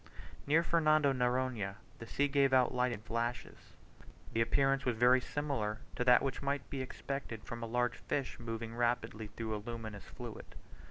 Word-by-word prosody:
Near 160 +4 +4
Fernando 155 -4 +4
Noronha 125 -5 0 0.2
the 115 - -8
sea 145 +4 +1
gave 140 -1 +3
out 130 -1 +4
light 125 0 +2
in 105 - -5
flashes. 115 +1 -3 0.7
The 115 - +2
appearance 135 +3 +2
was 125 -3 +1
very 125 +2 +6
similar 130 -8 -2 0.2
to - - 0
that 125 0 +6
which 135 -2 -2
might 140 -1 -1
be 135 - -2
expected 130 -3 -5
from 120 -2 -6
a 115 - -3
large 120 +1 0
fish 140 -1 -3
moving 115 -1 -5
rapidly 120 -2 0
through 110 +1 -4
a 105 - -4
luminous 110 -3 -6
fluid. - - -9
125 Hz, 170 wpm, -34 LUFS, 115-135 Hz, 0.7 s, very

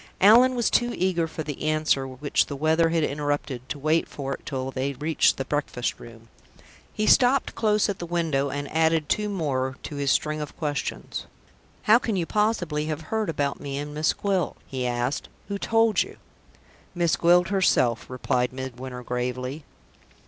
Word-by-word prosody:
Allan 240 +6 +7
was 240 -2 +1
too 240 0 +2
eager 175 -2 +1
for 160 0 -5
the 145 -2 -6
answer 155 -3 +1
which 130 +3 0
the 145 - -5
weather 160 +3 +2
had 165 -1 +1
interrupted 145 -3 -2
to - - -3
wait 155 +3 +1
for 135 -1 -4
it - - -10
till 135 -2 -3
they 135 +2 -2
reached 150 +4 +2
the 135 - -3
breakfast 145 -4 -2
room. 115 -1 -13 0.6
He 215 - -1
stopped 255 +4 +4
close 210 -1 +2
at 200 -2 -3
the 175 - -5
window, 160 -5 0
and 145 +1 -4
added 160 -1 +2
two 210 0 0
more 135 -9 -1
to 145 - -6
his 140 -1 0
string 155 +2 +1
of 150 - -7
questions. 145 -3 -3 0.6
"How 220 +3 +6
can 225 -3 -2
you 175 -3 0
possibly 175 -8 0
have 155 0 -3
heard 220 -3 0
about 145 -3 -1
me 140 -1 -5
and 145 +1 -5
Miss 155 +1 +2
Gwilt?" 195 -4 -1
he 130 -2 -3
asked. 120 +3 -2 0.2
"Who 200 0 -3
told 225 0 +3
you?" - - -5 0.8
"Miss 170 -2 +2
Gwilt 175 +1 +4
herself," 150 - +2
replied 125 -1 0
Midwinter, 130 -1 -7
gravely. 125 +4 -3
150 Hz, 175 wpm, -25 LUFS, 135-175 Hz, 0.8 s, Allan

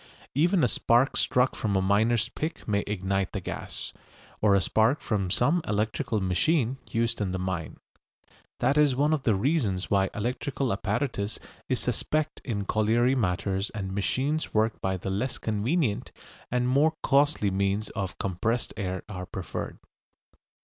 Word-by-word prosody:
Even 170 +5 +3
a - - +5
spark 120 +3 +3
struck 125 +1 +2
from 105 -3 -1
a - - +4
miner's 110 +4 +2
pick 155 +1 -5
may 100 -2 +2
ignite 95 -1 -1
the - - -2
gas; - - -6 0.5
or 105 -2 +5
a - - +5
spark 110 - +2
from 100 -4 -1
some 145 - +3
electrical 110 +3 0
machine 120 - +1
used 115 -1 0
in 95 -2 -1
the - - -1
mine. 95 -3 -3 0.8
That 145 +2 +3
is 145 -4 +4
one 145 +4 +2
of 155 - 0
the 115 -5 +2
reasons 105 - 0
why 95 -1 +3
electrical 125 +3 -1
apparatus 105 +1 -2 0.3
is 130 - +1
suspect 155 +6 -1
in 100 -5 -2
colliery 115 +5 +2
matters 100 -3 0
and 95 -2 -4
machines 135 +11 -1
worked 110 +1 +1
by 95 0 0
the 95 +1 -4
less 120 +7 -1
convenient 110 +3 0 0.4
and 125 0 +1
more 145 +5 +3
costly 140 -7 +3
means 100 +2 0
of 100 -3 -4
compressed 110 +6 -1
air 95 -3 -3
are 90 -3 -6
preferred. 95 - -5
110 Hz, 155 wpm, -27 LUFS, 100-130 Hz, 0.8 s, a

